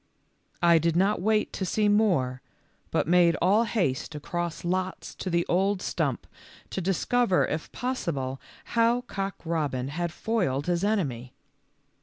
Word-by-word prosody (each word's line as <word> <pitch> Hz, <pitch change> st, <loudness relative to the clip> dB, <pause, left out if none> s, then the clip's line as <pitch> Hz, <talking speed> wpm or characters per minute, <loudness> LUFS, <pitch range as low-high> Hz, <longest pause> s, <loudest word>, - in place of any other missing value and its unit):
I 170 Hz, -1 st, +6 dB
did 165 Hz, 0 st, +1 dB
not 195 Hz, +2 st, +2 dB
wait 215 Hz, +2 st, +1 dB
to -, -, -3 dB
see 210 Hz, +3 st, +1 dB
more, 175 Hz, -13 st, +2 dB, 0.5 s
but -, -, 0 dB
made 175 Hz, -1 st, +4 dB
all 205 Hz, +6 st, +4 dB
haste 170 Hz, -, -1 dB
across 175 Hz, +3 st, -4 dB
lots 185 Hz, +1 st, -2 dB
to 185 Hz, -, -5 dB
the 170 Hz, 0 st, +1 dB
old 195 Hz, +2 st, +2 dB
stump -, -, -2 dB, 0.5 s
to 190 Hz, -, -2 dB
discover 195 Hz, +3 st, +2 dB
if 155 Hz, +1 st, -4 dB
possible 145 Hz, -, -3 dB, 0.3 s
how 235 Hz, +1 st, +3 dB
Cock 195 Hz, -5 st, -4 dB
robin 145 Hz, -6 st, -1 dB
had 170 Hz, +3 st, -2 dB
foiled 175 Hz, -, -1 dB
his 175 Hz, 0 st, 0 dB
enemy. 140 Hz, -, -1 dB
175 Hz, 140 wpm, -27 LUFS, 160-205 Hz, 0.5 s, I